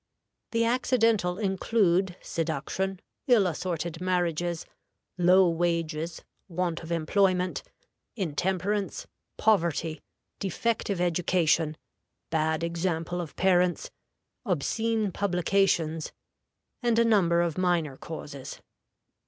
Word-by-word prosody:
The 230 Hz, 0 st, +1 dB
accidental 230 Hz, -6 st, +2 dB
include 190 Hz, -2 st, +1 dB
seduction, 170 Hz, +4 st, -2 dB, 0.3 s
ill 235 Hz, -6 st, +5 dB
assorted 170 Hz, -1 st, -3 dB
marriages, 175 Hz, -2 st, 0 dB, 0.5 s
low 180 Hz, +1 st, +6 dB
wages, 165 Hz, -1 st, -1 dB, 0.2 s
want 175 Hz, -2 st, -2 dB
of 165 Hz, 0 st, -8 dB
employment, 180 Hz, +2 st, +1 dB, 0.5 s
intemperance, 190 Hz, +2 st, -1 dB, 0.3 s
poverty, 170 Hz, -6 st, +1 dB, 0.4 s
defective 200 Hz, 0 st, -1 dB
education, 170 Hz, -2 st, +1 dB, 0.5 s
bad 160 Hz, 0 st, +1 dB
example 170 Hz, 0 st, -1 dB
of 165 Hz, -, -8 dB
parents, 180 Hz, -1 st, +2 dB, 0.5 s
obscene 220 Hz, -, 0 dB
publications, 180 Hz, -4 st, +1 dB, 0.7 s
and 240 Hz, -2 st, +2 dB
a 230 Hz, -, +5 dB
number 175 Hz, -7 st, +4 dB
of 170 Hz, -1 st, -1 dB
minor 170 Hz, -6 st, +1 dB
causes. 145 Hz, -2 st, -8 dB
180 Hz, 85 wpm, -28 LUFS, 165-195 Hz, 0.7 s, low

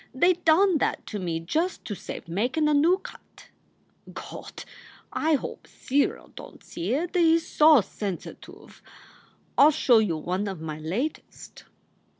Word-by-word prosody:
They 350 Hz, +7 st, +4 dB
done 345 Hz, +1 st, +3 dB
that -, -, -1 dB
to 210 Hz, -, -3 dB
me 170 Hz, -3 st, -3 dB
just 320 Hz, -, -2 dB
to 210 Hz, -, -4 dB
save 185 Hz, -, -8 dB
makin* 245 Hz, -, 0 dB
a 300 Hz, -, +2 dB
noo 325 Hz, +6 st, +4 dB
cut. -, -, -14 dB, 0.7 s
Gawd! -, -, -9 dB, 0.5 s
I 315 Hz, 0 st, +2 dB
hope -, -, -6 dB
Cyril 280 Hz, +2 st, -1 dB
don -, -, -12 dB
t -, -, -25 dB
see 185 Hz, +8 st, -4 dB
it. 345 Hz, +5 st, -3 dB
He 330 Hz, -2 st, +5 dB
s 330 Hz, -, 0 dB
so 310 Hz, +1 st, +5 dB
sensatuv. 195 Hz, -2 st, -8 dB, 0.8 s
I 280 Hz, -, +9 dB
ll -, -, +6 dB
show 260 Hz, -6 st, +4 dB
you 190 Hz, -7 st, 0 dB
one 185 Hz, +6 st, -3 dB
of 190 Hz, -4 st, -5 dB
my 155 Hz, -1 st, -6 dB
latest." 205 Hz, -, -5 dB
275 Hz, 155 wpm, -25 LUFS, -, 0.8 s, I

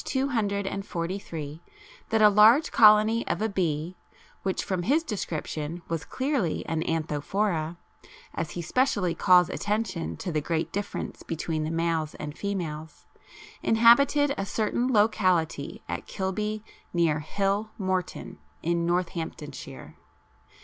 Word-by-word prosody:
243, 195 Hz, -, -2 dB, 0.5 s
that 220 Hz, -1 st, +3 dB
a -, -, +10 dB
large 220 Hz, +9 st, +6 dB
colony 215 Hz, +1 st, +6 dB
of -, -, -1 dB
a 220 Hz, -, +1 dB
bee, 175 Hz, -4 st, -1 dB, 0.5 s
which 190 Hz, -1 st, -1 dB
from 185 Hz, -2 st, -2 dB
his 285 Hz, -, +2 dB
description 170 Hz, -, -4 dB
was 165 Hz, -3 st, -2 dB
clearly 260 Hz, -, -1 dB
an 160 Hz, -1 st, -1 dB
Anthophora, 165 Hz, +2 st, -1 dB, 0.6 s
as 160 Hz, -1 st, -3 dB
he 170 Hz, -, -3 dB
specially 200 Hz, -, +1 dB
calls 180 Hz, -1 st, +5 dB
attention 205 Hz, -4 st, -2 dB
to 190 Hz, -5 st, -4 dB
the 155 Hz, -1 st, 0 dB
great 165 Hz, +1 st, -2 dB
difference 205 Hz, 0 st, -4 dB
between 160 Hz, -1 st, -3 dB
the -, -, -2 dB
males 165 Hz, -2 st, -1 dB
and 150 Hz, 0 st, -6 dB
females, 160 Hz, -6 st, -5 dB, 0.6 s
inhabited 275 Hz, +6 st, +5 dB
a 195 Hz, -, -1 dB
certain 235 Hz, +5 st, 0 dB
locality 185 Hz, -, +1 dB
at -, -, -5 dB
Kilby 210 Hz, +3 st, -3 dB, 0.3 s
near 165 Hz, -3 st, +2 dB
"Hill 200 Hz, +7 st, -1 dB
Morton" 185 Hz, -3 st, -3 dB, 0.2 s
in 170 Hz, 0 st, 0 dB
Northamptonshire. 165 Hz, -4 st, -4 dB
185 Hz, 120 wpm, -27 LUFS, 165-215 Hz, 0.6 s, a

